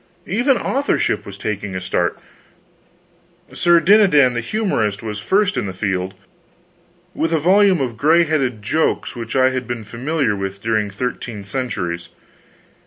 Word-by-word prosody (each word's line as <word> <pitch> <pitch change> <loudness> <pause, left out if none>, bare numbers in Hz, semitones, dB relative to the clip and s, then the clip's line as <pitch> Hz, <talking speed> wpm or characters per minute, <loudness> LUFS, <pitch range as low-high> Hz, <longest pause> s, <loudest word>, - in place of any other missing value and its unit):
Even 245 +7 +2
authorship 275 +2 0
was 100 -1 -8
taking 100 -1 -4
a - - -2
start; 90 -2 -1 1.4
Sir 175 -1 +4
Dinadan 170 -8 +5
the 120 - -2
Humorist 115 - -1
was 105 -2 -4
first 200 - +1
in - - -1
the 95 - -5
field, 95 -1 -2 1.0
with 165 - -1
a 165 - +3
volume 190 +3 +4
of 120 -4 -3
gray 160 +7 +4
headed 135 -9 -1
jokes 155 +9 0
which 115 -2 -6
I 130 0 +4
had 130 -1 -3
been 120 -2 -4
familiar 125 +1 -1
with 95 0 -5
during 110 -2 0
thirteen 110 0 -5
centuries. 95 -7 -4
120 Hz, 145 wpm, -19 LUFS, 100-165 Hz, 1.4 s, Dinadan